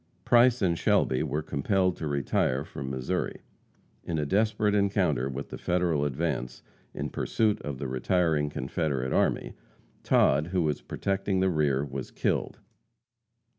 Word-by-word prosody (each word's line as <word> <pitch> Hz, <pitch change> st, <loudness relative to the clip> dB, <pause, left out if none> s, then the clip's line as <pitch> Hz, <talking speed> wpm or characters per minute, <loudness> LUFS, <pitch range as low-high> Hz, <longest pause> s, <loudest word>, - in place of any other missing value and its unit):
Price 120 Hz, -1 st, +5 dB
and 85 Hz, -3 st, +1 dB
Shelby 65 Hz, -, +2 dB
were 75 Hz, 0 st, -2 dB
compelled 90 Hz, +6 st, 0 dB
to 80 Hz, -, -4 dB
retire 70 Hz, -1 st, 0 dB
from 65 Hz, -1 st, -6 dB
Missouri. 65 Hz, -1 st, -3 dB, 0.6 s
In 80 Hz, -, -3 dB
a 75 Hz, -, 0 dB
desperate 105 Hz, +4 st, +1 dB
encounter 100 Hz, -10 st, +1 dB
with 70 Hz, +1 st, -6 dB
the -, -, -7 dB
Federal 85 Hz, -5 st, +1 dB
advance, 70 Hz, -3 st, -3 dB, 0.3 s
in -, -, -4 dB
pursuit 110 Hz, -2 st, 0 dB
of 70 Hz, -2 st, -5 dB
the 70 Hz, -, -4 dB
retiring 75 Hz, +3 st, +1 dB
Confederate 70 Hz, -2 st, -2 dB
army, -, -, +1 dB, 0.5 s
Todd, 75 Hz, +4 st, +3 dB
who 90 Hz, -1 st, 0 dB
was 75 Hz, -2 st, -1 dB
protecting 95 Hz, -1 st, -1 dB
the 95 Hz, 0 st, +2 dB
rear, 75 Hz, -3 st, +1 dB
was 65 Hz, -1 st, -6 dB
killed. -, -, -1 dB
75 Hz, 140 wpm, -28 LUFS, 70-95 Hz, 0.6 s, Price